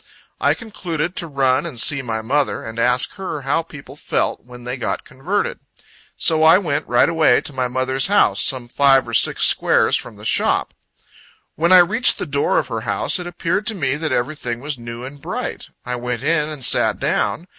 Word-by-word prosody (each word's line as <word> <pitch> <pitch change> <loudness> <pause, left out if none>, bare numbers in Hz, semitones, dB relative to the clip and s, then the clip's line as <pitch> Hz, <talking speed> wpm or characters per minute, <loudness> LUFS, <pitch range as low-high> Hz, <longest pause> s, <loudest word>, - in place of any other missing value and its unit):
I - - +2
concluded 175 - -5
to 170 - -2
run 135 -3 +1
and 155 -9 -5
see 140 +4 +3
my 110 -3 -4
mother, 140 +5 -1
and 110 +1 -7
ask 125 +1 +2
her 185 -7 -5
how 140 +5 +1
people 145 -4 -12
felt, - - -2
when 125 0 -13
they 125 +1 -4
got 125 - -4
converted. 170 +11 -3 0.6
So 160 -2 +2
I 160 +3 +7
went, 155 -7 -2
right 120 0 +3
away, 160 -7 +3
to 145 - -7
my 130 -1 -1
mother's 130 +1 -1
house, 205 +1 +3
some 130 -3 0
five 135 0 +3
or 115 - -7
six - - +2
squares - - +3
from - - -5
the - - -13
shop. - - +1 0.8
When 170 +3 0
I 185 - +9
reached 225 +7 +2
the - - -4
door 140 -1 0
of 140 -5 -1
her 115 -2 -3
house, 100 - -1
it 175 - -6
appeared 175 +4 -2
to 220 - 0
me 140 -7 -1
that 155 +1 -3
everything 120 -2 -2
was 145 +3 -4
new 120 0 -8
and 140 +2 -10
bright. - - -5 0.2
I 125 0 -2
went 125 0 -4
in, 155 0 +1
and 145 -5 -1
sat - - +3
down. 170 - -1
140 Hz, 200 wpm, -19 LUFS, 125-165 Hz, 0.8 s, I